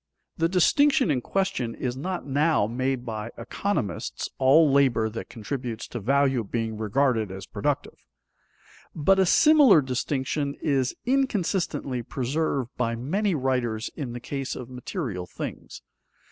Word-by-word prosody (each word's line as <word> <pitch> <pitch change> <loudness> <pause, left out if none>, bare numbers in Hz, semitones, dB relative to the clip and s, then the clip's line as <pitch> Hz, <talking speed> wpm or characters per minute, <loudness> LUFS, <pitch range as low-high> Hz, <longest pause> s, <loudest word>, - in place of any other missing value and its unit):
The 165 0 +1
distinction 265 - +4
in 130 -3 0
question 125 -10 -1
is 125 -1 -3
not 180 +7 -4
now 145 -2 +2
made 130 +2 -2
by 110 -1 -4
economists, 120 - -3
all 140 +3 +5
labor 125 -6 +3
that 115 - -7
contributes 120 0 -5
to 120 - -5
value 135 +2 +2
being 110 +1 -3
regarded 110 0 +1
as 95 0 -7
productive. - - -3 1.0
But 190 +5 +3
a 190 - +4
similar 295 - +6
distinction 140 +2 -2
is 135 -4 0
inconsistently 190 - 0
preserved 135 +1 -2
by 115 -2 0
many 180 - 0
writers 125 -5 -1
in 135 -6 -5
the 120 - -5
case 135 +2 -4
of 125 0 -8
material 125 - -5
things. - - -7
135 Hz, 130 wpm, -26 LUFS, 120-160 Hz, 1.0 s, similar